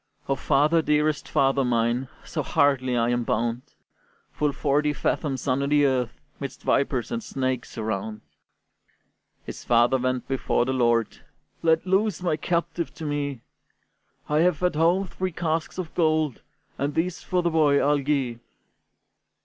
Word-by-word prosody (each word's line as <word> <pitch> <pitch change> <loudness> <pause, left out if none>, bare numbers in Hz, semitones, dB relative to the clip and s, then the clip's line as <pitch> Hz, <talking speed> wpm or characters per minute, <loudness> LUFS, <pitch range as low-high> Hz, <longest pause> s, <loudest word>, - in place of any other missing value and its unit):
"O 135 - +2
father, 150 +5 +3
dearest 150 -1 +1
father 135 -2 +2
mine, 120 +1 +1 0.2
So - - -3
hardly 130 -3 +2
I 115 0 +2
am 120 0 0
bound, 115 +1 -1 0.7
Full 150 -1 0
forty 150 +1 +1
fathoms 135 -1 -2
under 140 +2 +1
the 145 0 +4
earth, 125 -3 0 0.2
'Midst 140 -2 -7
vipers 135 -3 0
and 235 -1 -3
snakes 130 - -3
around!" 110 -1 -3 1.2
His - - -8
father 120 +2 +3
went 130 0 -1
before 135 -2 0
the 130 - -1
lord: 120 -3 +1 0.4
"Let 160 +1 +2
loose 195 +1 +2
thy 175 -4 0
captive 170 +1 -2
to 160 - -7
me! 145 -4 -2 0.9
I 150 +1 +1
have 175 0 +2
at 180 - +2
home 170 +5 +2
three 185 +1 -4
casks 160 0 -2
of 180 -4 -5
gold, 155 -5 +1 0.4
And 140 +1 -1
these 170 +2 -1
for 180 -1 -1
the 170 - +1
boy 150 -3 +4
I'll 145 0 +2
gi'e." 135 -4 -1
145 Hz, 150 wpm, -25 LUFS, 125-160 Hz, 1.2 s, the